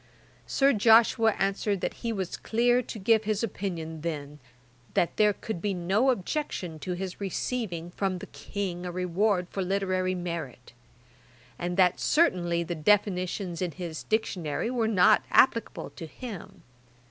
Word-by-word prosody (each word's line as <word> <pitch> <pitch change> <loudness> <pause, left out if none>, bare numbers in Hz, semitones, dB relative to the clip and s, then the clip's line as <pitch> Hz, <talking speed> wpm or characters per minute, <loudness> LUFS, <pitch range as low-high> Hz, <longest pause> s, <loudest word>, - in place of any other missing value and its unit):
Sir 275 0 +3
Joshua 225 0 +5
answered 195 0 0
that - - -1
he 230 - -1
was 190 -5 -3
clear 240 +2 +2
to 230 - -8
give 220 +2 +3
his 215 +1 0
opinion 170 -7 -4
then, 150 -3 -5 0.6
that 170 - +1
there 210 -1 +5
could 205 -3 -6
be 200 0 -1
no 195 +9 +2
objection 190 - -2
to 180 +3 -3
his 185 +2 -5
receiving 190 -3 -3
from 190 0 -1
the - - -8
King 185 -3 -5
a 180 - -4
reward 180 +2 +1
for 195 - -3
literary 185 -1 0
merit; 165 -10 -6 0.9
and 175 +1 -3
that 185 -1 +4
certainly 175 - +2
the 170 +1 -4
definitions 185 0 +1
in 175 -3 -2
his 170 -4 -6
Dictionary 215 -2 -1
were 235 -3 +1
not 185 -5 +5
applicable 230 -3 +2
to 165 - -8
him. 195 -3 -9
190 Hz, 145 wpm, -28 LUFS, 175-220 Hz, 0.9 s, Joshua